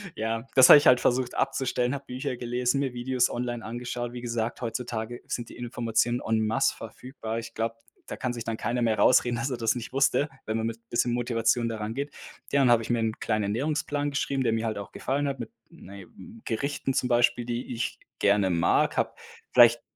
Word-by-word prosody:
Ja, 115 +2 -3
das 130 -1 +8
habe - - +12
ich 145 - +3
halt 125 -1 +6
versucht 125 0 +1
abzustellen, 130 -2 0
habe 140 -1 -6
Bücher 125 0 -4
gelesen, 125 +2 0
mir 135 -3 -1
Videos 125 0 +1
online 120 -1 -3
angeschaut. 120 +1 -5
Wie 125 - -6
gesagt, 115 0 -3
heutzutage 120 0 -4
sind 120 -1 -4
die - - -12
Informationen 120 0 0
en 110 0 +1
masse 110 - +2
verfügbar. 115 0 -6
Ich 115 0 -9
glaube, 115 0 -2 0.3
da - - -5
kann 130 - -2
sich 120 -2 -5
dann 115 - -2
keiner 120 +3 -1
mehr 110 -2 +2
rausreden, 120 +2 +4
dass 115 +4 -2
er 125 - -3
das 115 0 +1
nicht 120 -2 -6
wusste, 140 +2 +2 0.2
wenn 110 0 -1
man 110 - -1
mit 115 0 -4
'n 115 - -40
bisschen 120 0 +1
Motivation 120 -1 +1
da 115 - -4
rangeht. 115 +7 -4 0.4
Ja, 140 0 +3
dann 125 - +5
habe 115 -1 +4
ich - - -8
mir 120 -1 +1
'n 110 -1 -2
kleinen 110 -2 0
Ernährungsplan 145 +6 -1
geschrieben, 140 -1 -1
der 115 - +1
mir 115 0 -1
halt 110 -2 -2
auch 100 - -7
gefallen 140 +2 -1
hat 135 -2 -3
mit, 115 - -7 0.2
na 100 - -13
ja, 95 - -10 0.4
Gerichten 135 +3 -2
zum 125 - 0
Beispiel, 120 0 +3
die 120 +1 -4
ich 120 +1 -3 0.2
gerne 100 -1 +3
mag, 85 -1 +2
habe - - +1 0.4
vielleicht 120 -1 +7
120 Hz, 215 wpm, -27 LUFS, 115-125 Hz, 0.4 s, habe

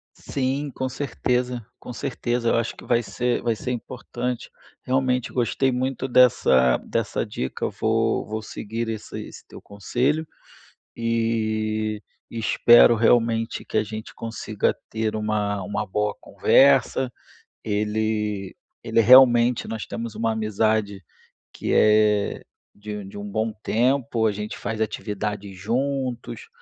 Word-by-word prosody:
Sim, 140 +2 -2
com 130 0 -3
certeza. 125 -3 -2
Com 125 - -8
certeza, 120 -2 -2
eu - - +2
acho 115 0 -2
que - - -13
vai 120 0 +2
ser 120 +4 -1
vai 115 -1 +1
ser 125 - -4
importante. 125 0 -5 0.3
Realmente 130 -1 0
gostei 130 +2 +1
muito 130 +1 -2
dessa 65 - +4
dessa - - -2
dica, 65 - -3
vou 115 0 0
vou 110 +1 -4
seguir 115 +2 -5
esse 110 -2 -6
esse - - -13
teu - - -12
conselho 130 +10 -1 0.7
e 110 -2 -1 0.3
espero 120 +1 +5
realmente 115 0 +2
que - - -5
a 110 - +4
gente 110 +1 -8
consiga 110 -2 -2 0.2
ter 110 -1 -2
uma 105 -2 -1
uma 105 +3 -3
boa 105 +2 -1
conversa, 135 -1 +3 0.5
ele 105 -2 -1 0.3
ele - - +1
realmente 120 0 +6
nós 110 -1 -4
temos 115 -1 -6
uma 115 0 0
amizade 110 -2 0 0.5
que - - -3
é 105 -1 +3 0.3
de 105 0 -7
de 95 +1 -9
um 100 0 -6
bom 110 +2 -1
tempo, 120 -1 +1
a 110 - +2
gente 105 +1 -5
faz 110 -1 -4
atividades 105 -2 -3
juntos, 130 - -3
115 Hz, 130 wpm, -24 LUFS, 105-125 Hz, 0.7 s, realmente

